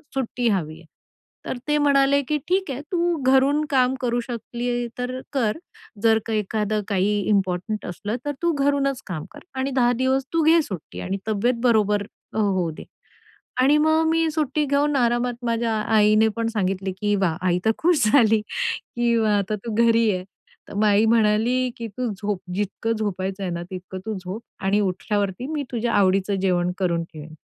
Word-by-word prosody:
सुट्टी 250 -2 -1
हवी 160 -6 -1
आहे. 170 - -17 0.6
तर 255 - -3
ते 295 - +2
म्हणाले, 280 -1 +4
की 300 - +1
"ठीक 375 -1 +1
आहे, 265 +2 -4
तू 345 -1 +1 0.2
घरून 280 +3 +4
काम 260 -3 +3
करू 240 -1 0
शकली 240 0 -3
तर 250 +1 -3
कर. 235 -4 0 0.5
जर 225 -1 +5
का 225 - -3
एखादं 215 0 -1
काही 205 +1 +1
इम्पॉर्टंट 195 +1 0
असलं 205 +5 -4
तर 290 - 0
तू 340 0 +2
घरूनच 275 -1 +1
काम 165 -5 -5
कर - - -11 0.2
आणि 270 +1 -1
10 245 -2 +3
दिवस 260 +1 +1
तू 330 - +3
घे 325 +2 +5
सुट्टी 190 - -7
आणि 195 +2 -2
तब्येत 220 +4 +1
बरोबर 210 -4 +3 0.3
अ, - - -5
होऊ 190 -5 +1
दे." 155 - -10 0.8
आणि 280 +3 +5
मग 315 +1 +3
मी 325 0 +2
सुट्टी 300 -1 0
घेऊन 285 +1 +1
आरामात, 240 0 +1
माझ्या 230 -1 0 0.2
आईने 215 +1 +5
पण 230 0 0
सांगितलं, 195 -2 -1
की 205 0 +2
वाह, 185 -5 0
आई 180 0 +2
तर 220 - +5
खुश 325 -5 +2
झाली, 225 -5 +5
की 235 +2 -2
व 225 - +2
आता 200 +1 -1
तू 230 - -3
घरी 230 -1 +4
आहे. 180 - -4 0.5
तर - - -9
मग 210 +1 +2
आई 210 +2 +4
म्हणाली, 230 +3 +2
की 230 - -5
"तू 240 +3 -3
झोप, 205 -1 -3 0.2
जितकं 205 +3 -1
झोपायचं 195 -2 -3
आहे 185 - -2
ना 170 0 -4
तितकं 185 0 -7
तू 220 - -2
झोप 190 +5 -6 0.2
आणि 200 +2 +3
उठल्यावरती 200 +4 -2
मी 295 -2 -1
तुझ्या 235 -1 -1
आवडीचं 195 0 +2
जेवण 180 -2 +1
करून 170 -3 0
ठेवेन." 155 +1 -10
225 Hz, 180 wpm, -23 LUFS, 200-260 Hz, 0.8 s, जर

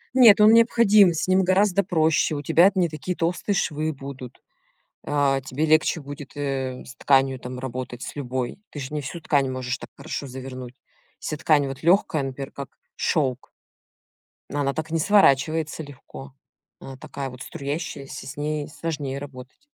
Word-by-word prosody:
Нет, 225 -5 +8
он 215 +1 +8
необходим, 220 -4 +6
с 160 - -2
ним 185 0 +4
гораздо 195 +1 +3
проще, 160 -3 +2
у 145 - -4
тебя 170 +7 +5
т 190 - -3
не 175 - +3
такие 160 +3 -5
толстые 175 +4 -1
швы 155 -3 -1
будут. 135 -2 -9 0.6
Э, 140 -2 +1
тебе 140 +4 -2
легче 155 +1 +3
будет, 145 0 -9
э, 135 -3 -3
с 125 - -11
тканью 135 -1 +2
там 125 0 -7
работать, 125 -1 -6
с - - -7
любой. 130 +2 -4
Ты 145 - -8
же 135 +2 -6
не 150 - -2
всю 155 +5 -6
ткань 140 -4 +1
можешь 130 -1 -3
так - - -10
хорошо 140 - -5
завернуть. 130 -1 -8 0.4
Вся 155 - -4
ткань 145 -2 +3
вот 135 -1 -7
лёгкая, 170 -3 +3
например, 135 0 -5
как 140 -1 -9 0.2
шёлк 130 -5 -1 1.0
она 140 -1 -1
так 160 0 -5
не 165 - +1
сворачивается 160 -4 +3
легко. 140 -1 -12 0.5
Она 135 -1 -10
такая 135 0 -6
вот 125 +1 -12
струящаяся, 140 -1 -6
с 140 - -7
ней 150 0 -2
сложнее 145 -4 -4
работать. 140 - -11
145 Hz, 165 wpm, -24 LUFS, 135-165 Hz, 1.0 s, Нет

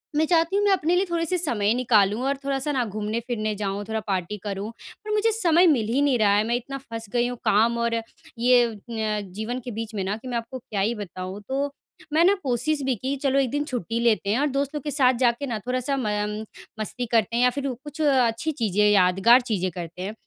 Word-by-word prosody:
मैं 310 +1 +3
चाहती 330 +2 +2
हूँ 405 - +2
मैं 405 - +4
अपने 355 -2 +2
लिए 370 +2 +2
थोड़े-से 340 +1 0
समय 230 - +1
निकालूँ 220 -3 +2
और 275 0 0
थोड़ा-सा 275 +1 -1
ना 260 -3 +1
घूमने-फिरने 215 +1 -3
जाऊँ 200 0 -3
थोड़ा 220 0 -2
पार्टी 190 +1 -2
करूँ। 200 0 -4 0.4
पर 425 - -4
मुझे 425 +2 +2
समय 360 -5 +4
मिल 250 -9 +2
ही 275 - +2
नहीं 280 -3 +3
रहा 205 -2 +4
है 210 - +3
मैं 235 - +1
इतना 260 +3 -4
फँस 230 -4 -7
गई 240 0 +2
हूँ 245 0 -5
काम 230 +3 +3
और 235 0 0 0.5
ये 245 0 +5 0.2
न 220 -2 -1
जीवन 220 +5 -4
के 245 - -4
बीच 225 0 -5
में 195 - -1
ना 195 +2 -1
कि 230 - -11
मैं 245 -1 -2
आपको 230 +3 -6
क्या 210 -4 -4
ही 225 +4 +1
बताऊँ? 190 -1 -7
तो 280 +2 -1 0.4
मैं 320 +2 +5
ना 385 - +6
कोशिश 270 +4 0
भी 265 -1 +1
की 260 +6 -3
चलो 275 0 +3
1 265 -2 +1
दिन 290 0 0
छुट्टी 230 - -3
लेते 230 -4 +1
हैं 220 +5 +2
और 290 - +2
दोस्तों 280 +1 -2
के 295 - -4
साथ 260 -2 +4
जाके 240 +4 +1
ना 230 -4 -3
थोड़ा-सा 255 +2 -1
म 240 - -2 0.7
मस्ती 245 +3 -3
करते 230 0 +2
हैं 240 - +3
या 250 - +6
फ़िर 275 +2 -3 0.2
कुछ 300 +1 -7
अच्छी 265 -1 +2
चीज़ें, 210 - +1
यादगार 195 +5 +5
चीज़ें 205 -7 -1
करते 175 +1 -7
हैं। 195 +3 -4
240 Hz, 230 wpm, -24 LUFS, 215-280 Hz, 0.7 s, ना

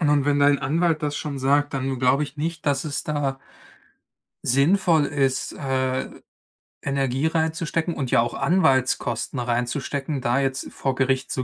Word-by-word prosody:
Und 145 -3 +3
wenn 145 0 +2
dein 145 0 +5
Anwalt 155 +3 0
das 145 -1 -1
schon 145 -2 -4
sagt, 140 +2 +2
dann 135 -1 -2
glaube 135 +3 +3
ich 140 +1 -11
nicht, 160 +1 -4
dass 140 +1 +1
es 145 -2 -3
da 145 -3 -1 1.1
sinnvoll 160 +4 +3
ist, 135 -2 0
äh, 130 -2 -1 0.7
Energie 135 +1 0
reinzustecken 160 +1 -1
und 135 -3 -3
ja - - +5
auch 120 - -2
Anwaltskosten 135 -5 +1
reinzustecken, 130 +4 -2
da 120 +3 +1
jetzt 135 0 -2
vor 135 -2 -2
Gericht 130 0 0
zu 130 - -1
140 Hz, 150 wpm, -23 LUFS, 130-150 Hz, 1.1 s, dein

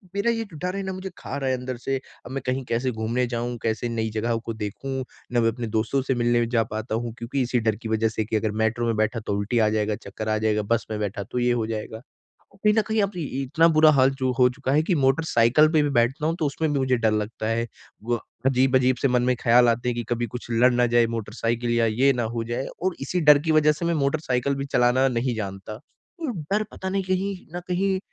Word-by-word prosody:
मेरा 235 +4 +2
ये 225 -1 -1
जो 160 - -10
डर 180 +1 -1
है 195 - -3
ना 190 0 -4
मुझे 185 0 -6
खा - - -6
रहा 135 -2 -1
है 130 - +1
अंदर 125 0 -5
से 135 - +1 0.3
अब 125 - -9
मैं 135 - -3
कहीं 130 +1 -1
कैसे 125 +2 -1
घूमने 115 +2 -1
जाऊँ, 120 0 -3
कैसे 115 +1 -1
नई 110 -1 -2
जगहों 115 +1 0
को 115 0 -5
देखूँ 130 +6 -4 0.3
ना 120 - +3
मैं 115 0 +3
अपने 115 0 -5
दोस्तों 120 +5 0
से 130 0 -1
मिलने 120 0 +2
जा 115 -1 +2
पाता 110 +1 -3
हूँ 115 0 -3
क्योंकि 125 +4 -2
इसी 125 -1 +1
डर 110 -2 +1
की 110 0 -7
वजह 110 0 +2
से 110 0 -2
की 110 - -3
अगर 110 0 0
मेट्रो 115 +2 0
में 115 - +1
बैठा 110 +2 0
तो 105 -2 -4
उल्टी 110 +4 0
आ 110 - +4
जाएगा, 105 -1 0
चक्कर 110 +3 -6
आ 110 - +2
जाएगा, 105 0 +1
बस 115 +3 0
में 105 - -2
बैठा 100 -1 -3
तो 125 - -1
ये 120 0 +2
हो 115 -2 -1
जाएगा। 110 0 -5 0.5
कहीं 210 +2 +2
न - - +6
कहीं 220 -1 +1
अब 200 - -1
इ - - -3 0.2
इतना 160 +5 +3
बुरा 155 0 +7
हाल 135 -2 +4
जो 130 -1 +1
हो 125 - +7
चुका 130 +1 -3
है 155 +2 +3
कि 180 0 +1
मोटरसाइकिल 135 0 +3
पे 155 - +5
भी 145 - +1
बैठता 135 +6 +1
हूँ 165 - 0
तो 155 - +1
उसमें 150 +2 -1
भी 140 - +1
मुझे 130 -1 +2
डर 110 -2 +2
लगता 110 +1 -2
है। 115 +1 0 0.4
व 120 - +1 0.3
अजीब-अजीब 130 -1 +3
से 140 - +4
मन 125 -1 +2
में 125 0 +2
ख़याल 120 +1 +5
आते 120 +1 0
हैं 120 - -2
कि 120 - -3
कभी 120 0 0
कुछ 120 +3 -8
लड़ 120 +2 +4
ना 120 0 +3
जाए 120 -1 +5
मोटरसाइकिल 115 +2 -2
या 115 -1 +3
ये 125 +5 +3
ना 120 -2 -1
हो 115 - -1
जाए 120 +3 -3 0.2
और 185 -1 0
इसी 175 +6 -1
डर 150 -1 +7
की - - +3
वजह 150 -1 +5
से 155 +3 -5
मैं 170 - +1
मोटरसाइकिल 140 -3 0
भी 140 0 -3
चलाना 130 0 +3
नहीं 120 0 -1
जानता। 100 0 -6 0.7
डर 210 +1 +2
पता 190 - -5
नहीं 195 0 -1
कहीं 190 +2 -1 0.2
न 175 - -2
कहीं 190 +1 0
125 Hz, 255 wpm, -24 LUFS, 115-140 Hz, 0.7 s, बुरा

